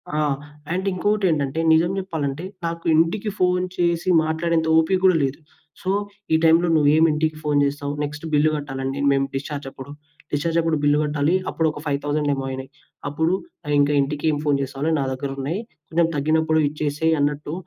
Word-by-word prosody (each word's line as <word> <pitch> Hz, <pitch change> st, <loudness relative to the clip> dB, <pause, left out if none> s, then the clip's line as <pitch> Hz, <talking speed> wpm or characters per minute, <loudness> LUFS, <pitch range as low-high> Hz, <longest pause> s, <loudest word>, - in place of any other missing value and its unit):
ఆ! -, -, 0 dB, 0.6 s
అండ్ 190 Hz, +2 st, -2 dB
ఇంకో‌టెంటంటే, 175 Hz, -7 st, 0 dB
నిజం 170 Hz, +3 st, +3 dB
చెప్పాలంటే, 160 Hz, -4 st, -3 dB, 0.2 s
నాకు 165 Hz, 0 st, -4 dB
ఇంటికి 185 Hz, +7 st, +1 dB
ఫోన్ 180 Hz, 0 st, +2 dB
చేసి 170 Hz, +1 st, +1 dB
మాట్లాడేంత 160 Hz, +1 st, 0 dB
ఓపిక 175 Hz, +4 st, +3 dB
కూడా 185 Hz, -, +6 dB
లేదు. 135 Hz, +4 st, -2 dB, 0.4 s
సో, 185 Hz, -, -3 dB, 0.4 s
ఈ -, -, +6 dB
టైమ్‌లో 165 Hz, +2 st, +5 dB
నువ్వేమి 155 Hz, +2 st, +4 dB
ఇంటికి 155 Hz, 0 st, -1 dB
ఫోన్ 145 Hz, -1 st, +2 dB
చేస్తావు. 145 Hz, 0 st, -3 dB
నెక్స్ట్ 150 Hz, +2 st, -5 dB
బిల్లు 150 Hz, +1 st, +4 dB
కట్టాలండి. 135 Hz, -1 st, -4 dB
మేము 135 Hz, 0 st, +2 dB
డిశ్చార్జ్ 140 Hz, +1 st, -4 dB
అప్పుడు. 135 Hz, +2 st, -10 dB, 0.4 s
డిశ్చార్జ్ 165 Hz, +3 st, 0 dB
అప్పుడు 160 Hz, -2 st, 0 dB
బిల్లు 145 Hz, 0 st, +3 dB
కట్టాలి. 150 Hz, +3 st, +1 dB
అప్పుడు 160 Hz, -, 0 dB
ఒక 150 Hz, -, -9 dB
5000 145 Hz, +1 st, 0 dB
ఏమో 135 Hz, -1 st, -4 dB
అయినాయి. 130 Hz, +1 st, -7 dB, 0.4 s
అప్పుడు 160 Hz, +4 st, 0 dB, 0.5 s
ఇంకా 145 Hz, +1 st, +3 dB
ఇంటికి 145 Hz, +2 st, -3 dB
ఏం 145 Hz, -, -1 dB
ఫోన్ 145 Hz, -2 st, +3 dB
చేస్తావని 140 Hz, +4 st, -2 dB
నా 140 Hz, -, 0 dB
దగ్గరున్నాయి. 135 Hz, +6 st, -3 dB, 0.3 s
కొంచెం 165 Hz, 0 st, +2 dB
తగ్గినప్పుడు 160 Hz, +2 st, +2 dB
ఇచ్చేసేయ్ 150 Hz, +2 st, 0 dB
అన్నట్టు. 145 Hz, +1 st, -1 dB
150 Hz, 160 wpm, -22 LUFS, 145-165 Hz, 0.6 s, కూడా